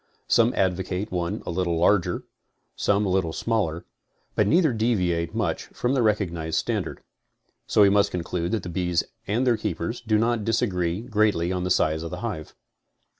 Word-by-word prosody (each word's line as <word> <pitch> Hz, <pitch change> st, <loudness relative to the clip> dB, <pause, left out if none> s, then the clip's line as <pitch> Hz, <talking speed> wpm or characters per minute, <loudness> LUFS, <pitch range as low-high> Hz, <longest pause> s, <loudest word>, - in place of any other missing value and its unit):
Some 115 Hz, +1 st, +4 dB
advocate 95 Hz, +2 st, -1 dB
one 85 Hz, -2 st, -2 dB
a -, -, -3 dB
little 85 Hz, -1 st, 0 dB
larger, 90 Hz, +2 st, +2 dB, 0.5 s
some 100 Hz, +1 st, +1 dB
a -, -, 0 dB
little 90 Hz, -3 st, +1 dB
smaller, 100 Hz, -8 st, -1 dB, 0.5 s
but 105 Hz, -, +2 dB
neither 160 Hz, -, +4 dB
deviate 90 Hz, -8 st, 0 dB
much -, -, -1 dB
from 125 Hz, +2 st, -2 dB
the 135 Hz, -, +2 dB
recognized 85 Hz, -7 st, 0 dB
stan -, -, 0 dB
dard. -, -, -8 dB, 0.7 s
So 105 Hz, -, +5 dB
we 100 Hz, -, +6 dB
must 100 Hz, 0 st, +4 dB
conclude 85 Hz, 0 st, -3 dB
that 110 Hz, -5 st, -1 dB
the 90 Hz, -, -5 dB
bees 90 Hz, -1 st, 0 dB, 0.2 s
and 115 Hz, +6 st, +1 dB
their 120 Hz, -3 st, +3 dB
keeper 115 Hz, -, -2 dB
do 110 Hz, -1 st, +3 dB
not 115 Hz, 0 st, +1 dB
disagree 95 Hz, -5 st, 0 dB
greatly 105 Hz, -7 st, +1 dB
on 90 Hz, -1 st, -2 dB
the -, -, -1 dB
size 80 Hz, -3 st, +2 dB
of 85 Hz, -, -5 dB
the -, -, -6 dB
hive. 100 Hz, -10 st, -5 dB
95 Hz, 175 wpm, -25 LUFS, 85-110 Hz, 0.7 s, we